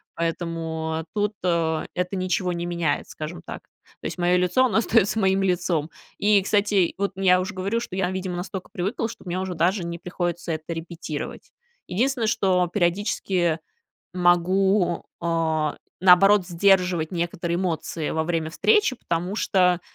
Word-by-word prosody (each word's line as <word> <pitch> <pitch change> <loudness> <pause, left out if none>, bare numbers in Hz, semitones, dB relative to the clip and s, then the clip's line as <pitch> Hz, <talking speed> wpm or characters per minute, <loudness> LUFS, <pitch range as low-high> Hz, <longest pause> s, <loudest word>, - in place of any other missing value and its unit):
Поэтому 165 -1 -3
тут, 210 0 0
а, 165 -3 +1
это 180 +2 -2
ничего 185 0 0
не 170 0 -3
меняет, 170 -3 -1
скажем 160 +3 -7
так. - - -7 0.4
То - - -11
есть - - -4
моё 180 0 +3
лицо 180 +8 +3
оно 235 - +1
остаётся 225 -2 +2
моим 190 -1 +2
лицом. 175 -4 0 0.3
И, 205 -1 +4
кстати, 200 -2 +2
вот 200 +1 -1
ну 195 - -5
я 180 -1 +5
уже 190 +3 -3
говорю, 195 +5 -1
что 235 -5 -6
я, 190 -2 0
видимо, 185 -1 -3
настолько 185 +1 -6
привыкла, 200 +6 -2
что - - -11
мне 180 0 -3
уже 185 -1 -3
даже 180 +3 +1
не 170 0 -5
приходится 175 -1 -3
это 155 +1 -5
репетировать. 165 -2 -6 0.4
Единственное, 240 +4 0
что 185 -4 +2
периодически 175 -2 0 0.6
могу, 180 +1 +2 0.2
а, 160 -2 0 0.2
наоборот, 190 +2 +6
сдерживать 180 -2 +2
некоторые 170 0 -2
эмоции 165 -3 -2
во 160 - 0
время 165 -1 -1
встречи, 420 - +3
потому 175 -1 -2
что 180 -5 +2
180 Hz, 155 wpm, -24 LUFS, 170-195 Hz, 0.6 s, наоборот